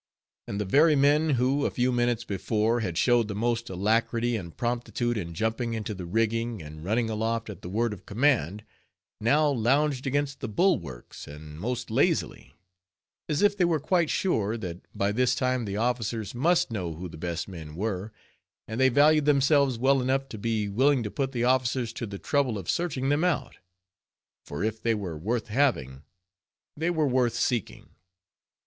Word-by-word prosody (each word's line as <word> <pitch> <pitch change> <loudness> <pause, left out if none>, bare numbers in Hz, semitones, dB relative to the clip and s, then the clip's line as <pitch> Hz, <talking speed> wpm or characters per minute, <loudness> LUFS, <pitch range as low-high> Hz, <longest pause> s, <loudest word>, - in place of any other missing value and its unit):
And 100 - -4
the 105 - -1
very 150 - +5
men 145 +3 +3
who, 130 +4 +1
a - - +2
few 125 +1 0
minutes 120 -1 +1
before, 110 +2 0
had 90 -7 -3
showed 120 +1 +3
the 100 - -5
most 120 +2 -1
alacrity 115 +5 +1
and 85 -6 -7
promptitude 120 0 -1
in 85 -6 -5
jumping 115 +4 -1
into 110 -1 -4
the 90 -3 -7
rigging 115 +3 0
and 75 -1 -10
running 110 +5 0
aloft 110 0 -2
at 95 - -11
the 90 - -7
word 110 +3 0
of 100 - -13
command, 105 - +1 0.6
now 145 +8 +3
lounged 135 +2 +1
against 145 0 -1
the - - -4
bulwarks 110 - -1
and 75 +1 -10
most 120 +3 -3
lazily; 120 - 0 0.7
as 150 +4 +1
if 205 0 +4
they 190 - +1
were 170 -3 +2
quite 170 +2 +1
sure, 115 - 0
that 90 -5 -6 0.2
by 100 +1 +1
this 125 +3 +2
time 130 -2 0
the 100 0 -3
officers 115 -3 -1
must 160 +4 +2
know 90 -7 -3
who 90 +3 -6
the 80 - -11
best 85 +1 -4
men 80 -5 -9
were, 100 +2 -3 0.6
and 110 +3 -5
they 130 - +6
valued 150 +3 +4
themselves 140 -2 +3
well 135 +2 +3
enough 135 +2 0
to 110 - -7
be 110 -1 -1
willing 130 +5 +2
to 105 - -4
put 135 -1 -2
the 120 -3 -2
officers 125 -2 +1
to 115 - -5
the 100 -1 -6
trouble 135 -1 0
of 95 -4 -7
searching 145 -6 -1
them 145 +3 +2
out; 150 -8 -1 0.9
for 70 - -4
if 110 0 -2
they 115 -1 +1
were 95 -6 -4
worth 110 +8 -2
having, 105 - 0 0.7
they 160 +3 -1
were 160 -4 +1
worth 125 -3 +1
seeking. 120 -3 -2
115 Hz, 180 wpm, -27 LUFS, 105-135 Hz, 0.9 s, they